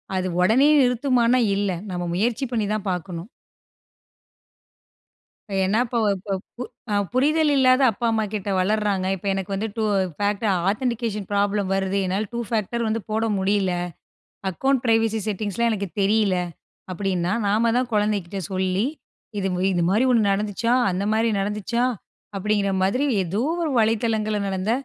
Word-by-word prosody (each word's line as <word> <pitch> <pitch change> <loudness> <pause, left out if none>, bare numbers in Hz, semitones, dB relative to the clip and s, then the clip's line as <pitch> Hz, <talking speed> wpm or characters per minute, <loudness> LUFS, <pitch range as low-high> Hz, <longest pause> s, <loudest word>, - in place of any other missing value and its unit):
அது 185 0 0
ஓடனே 230 +10 +5
நிறுத்துமான்னா 250 -1 +2 0.2
இல்ல. 200 -1 0 0.2
நம்ம 175 -1 -3
முயற்சி 235 +7 0
பண்ணி 225 -3 0
தான் 215 -1 -3
பார்க்கணும். 180 +1 -5 2.4
என்ன 195 +3 +1
இப்ப 235 0 -1 0.9
ப 210 - -2 0.2
புரிதல் 300 +4 +3
இல்லாத 260 0 +4
அப்பா 230 +2 -3
அம்மாகிட்ட 210 -2 -2
வளர்றாங்க, 200 0 +1
இப்ப 195 +1 -8
எனக்கு 195 0 -4
வந்து 210 +3 -2
டூ 220 - 0 0.3
ஃபேக்ட் 205 +1 -1 0.3
ஆதன்டிகேஷன் 225 -2 -2
ப்ராப்ளம் 205 -1 +1
வருது 195 0 0
என்னால் 195 +4 -1
டூ 235 - -2
ஃபேக்டர் 230 +1 -1
வந்து 220 +1 -1
போட 220 +1 0
முடியல, 195 0 +1 0.8
அக்கௌண்ட் 265 +8 0
பிரைவசி 225 -1 +2
செட்டிங்ஸ்லாம் 215 +2 -1
எனக்கு 200 -3 -3
தெரியல 205 -1 +2 0.6
அப்டின்னா, 185 -1 -1
நாம 220 +3 +2
தான் 250 -1 0
கொழந்தைகிட்ட 205 -3 0
சொல்லி, 190 +2 0 0.5
"இது 195 -1 -1 0.2
இது 175 -2 +1
மாதிரி 215 +7 +3
ஒண்ணு 235 -2 +4
நட 200 - +3
நடந்துச்சா, 210 +3 -1 0.2
அந்த 185 +2 -2
மாதிரி 225 +1 +2
நடந்துச்சா," 210 +4 -1 0.5
அப்டின்ன்ற 200 0 0
மாரி 250 +10 +1 0.2
ஏதோ 190 +5 -2 0.2
ஒரு 315 - -1
வலைத்தளங்கள்ல 220 -1 +1
நடந்த 190 +2 -1
210 Hz, 135 wpm, -23 LUFS, 195-230 Hz, 2.4 s, ஓடனே